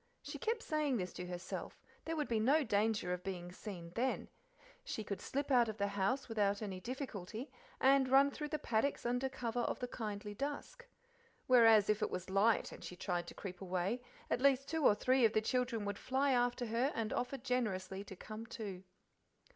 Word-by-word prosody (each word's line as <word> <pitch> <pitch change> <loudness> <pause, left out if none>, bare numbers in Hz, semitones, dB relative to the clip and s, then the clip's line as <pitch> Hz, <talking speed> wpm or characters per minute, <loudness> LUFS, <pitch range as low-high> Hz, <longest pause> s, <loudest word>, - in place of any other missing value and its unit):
she - - -6
kept 455 -1 -1
saying 300 -5 +1
to 180 -2 -4
herself: 180 0 -5 0.3
there 325 - -2
would 300 -2 -1
be 230 -2 +1
no 280 +8 +4
danger 210 -5 +1
of 180 0 -5
being 180 -2 -5
seen 180 -3 -8
then; 255 +5 0 0.6
she 225 - -4
could 200 -2 -4
slip 280 +1 -2
out 240 -3 +5
of 215 - -5
the 200 -1 0
house 205 +7 0
without 205 -3 +1
any 195 -4 -4
difficulty, 235 0 -5 0.3
and 265 0 +5
run 275 +2 +6
through 300 +2 -4
the 305 - -2
paddocks 260 -1 0
under 245 +2 +1
cover 245 -3 -3
of 240 - 0
the 250 - -3
kindly 210 -3 -5
dusk; 285 - -5 0.6
whereas 225 -4 +7
if 210 +1 +2
it - - +1
was 185 +1 -5
light, 205 +3 +3
and - - -10
she 180 - -7
tried 175 -1 -2
to - - -9
creep 185 -2 -7
away, 190 +5 -1 0.3
at - - 0
least 275 0 +4
two 320 -1 -1
or 210 - +6
three 255 +4 +3
of 220 -1 +5
the - - +4
children 240 -2 0
would 205 0 -3
fly 270 +2 +1
after 245 0 +2
her 235 +5 +1
and 220 -1 -1
offer 250 +3 -1
generously 205 -7 -1
to 195 - -9
"come 215 +4 -8
too." 200 -7 -6
225 Hz, 195 wpm, -36 LUFS, 200-265 Hz, 0.6 s, whereas